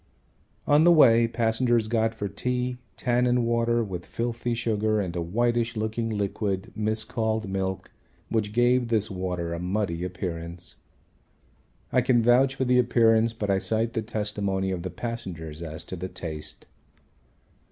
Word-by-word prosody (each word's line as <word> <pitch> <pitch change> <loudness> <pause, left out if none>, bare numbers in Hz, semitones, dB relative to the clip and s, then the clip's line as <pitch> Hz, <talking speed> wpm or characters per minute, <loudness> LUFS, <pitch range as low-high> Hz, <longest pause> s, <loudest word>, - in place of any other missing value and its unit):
On 145 +2 +5
the 175 - +7
way 115 -8 +6
passengers 115 0 +1
got 115 0 +1
for 105 -2 -3
tea 125 +3 -2 0.2
tannin 125 0 +2
water 115 0 +1
with 90 -4 -6
filthy 120 0 -2
sugar 110 -2 0
and 90 -4 -3
a 85 - -1
whitish 120 +6 0
looking 110 +1 -2
liquid 100 -2 -2
mis 110 +1 -1
called 110 -1 -2
milk 95 0 -3 0.4
which 105 -2 -1
gave 120 +2 +3
this 110 -2 0
water 90 -3 -3
a 85 - -4
muddy 90 -1 -2
appearance. 85 -1 -5 1.1
I 125 - +4
can 120 -1 +3
vouch 130 +3 +4
for 130 - -1
the 125 0 +4
appearance, 115 -2 +4
but 105 -3 -2
I 95 - +2
cite 115 +3 0
the 115 - -1
testimony 105 -3 -2
of 90 -2 -3
the 95 - -4
passengers 85 -7 -6
as 80 -1 -5
to - - -6
the 90 +1 -5
taste. 80 -4 -7
110 Hz, 150 wpm, -26 LUFS, 95-120 Hz, 1.1 s, the